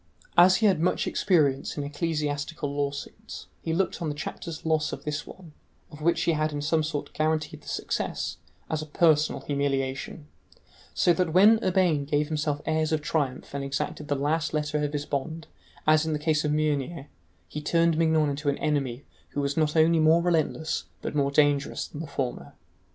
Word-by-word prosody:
As 180 +2 +7
he 220 - +1
had 190 -6 +4
much 175 +3 +1
experience 150 -10 +1
in 145 - -2
ecclesiastical 145 0 -2
lawsuits, 140 0 -5 0.2
he 165 - -3
looked 180 +2 0
on 160 - -1
the 145 - -3
chapter's 160 +3 -6
loss 155 -1 +1
of - - -7
this 150 -1 -3
one, 170 -5 -12 0.4
of 150 -1 -11
which 170 +2 +2
he - - +2
had 155 -1 0
in 145 - -3
some 155 +2 +1
sort 150 -2 -4
guaranteed 155 0 -1
the - - -18
success, - - -3 0.3
as 155 -1 -2
a 155 - -7
personal 155 -1 +3
humiliation, 140 +1 -2 0.7
so 175 - +4
that 165 -1 0
when 210 +5 +6
Urbain 180 -6 +2
gave 150 +1 0
himself 150 -2 -1
airs 155 0 0
of 155 -1 0
triumph 140 -5 -2
and 140 -1 -3
exacted 140 +2 -3
the 145 - 0
last 155 +3 0
letter 150 0 -1
of 145 - -1
his 145 0 -2
bond, 160 +4 -3 0.4
as 155 0 +5
in 160 -1 -1
the - - 0
case 150 0 +1
of 150 - 0
Meunier, 150 -1 -1 0.4
he 150 - -6
turned 165 +1 +2
Mignon 160 -2 +2
into 145 +1 -2
an 140 - 0
enemy 140 -4 -1 0.3
who 145 - -1
was 140 0 -1
not 155 -1 +1
only 160 +1 +5
more 160 +2 +5
relentless 160 -2 0 0.2
but - - -3
more 140 -2 +2
dangerous 145 0 +2
than 150 - -8
the 165 - -6
former. 130 -3 -4
150 Hz, 190 wpm, -27 LUFS, 145-160 Hz, 0.7 s, As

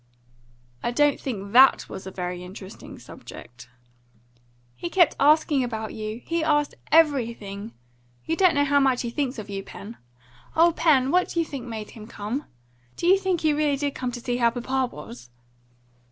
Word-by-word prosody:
"I - - -1
don't 290 +4 +2
think 200 -6 -5
THAT 260 +4 +6
was 190 - -8
a - - -4
very 180 -1 -5
interesting 190 +1 -10
subject." 120 0 -12 1.1
"He 345 - -5
kept 350 -3 +4
asking 295 -1 +4
about 220 -3 -4
you. 215 +2 -6
He 335 -1 -1
asked 295 -2 +1 0.2
everything. 230 -9 +1 0.5
You 325 - 0
don't 365 -1 +4
know 285 - +3
how 285 0 +3
much 265 -3 +2
he 235 - -3
thinks 270 0 -2
of 215 -2 -7
you, 200 -1 -4
Pen. 205 +3 -10 0.6
O 335 +1 +5
Pen! 295 -6 +3
what 360 +1 +2
do 340 - -2
you 330 - +1
think 265 -5 -7
made 220 -2 -6
him 215 -1 -11
come? 230 +6 -5 0.5
Do - - -4
you 370 +2 +7
think 375 -3 -1
he 310 -1 +3
really 295 -1 +1
did 285 0 -2
come 250 -1 -3
to 240 - -5
see 245 0 -2
how 235 -1 +4
papa 255 +2 -1
was?" 120 -5 -10
255 Hz, 180 wpm, -25 LUFS, 215-295 Hz, 1.1 s, you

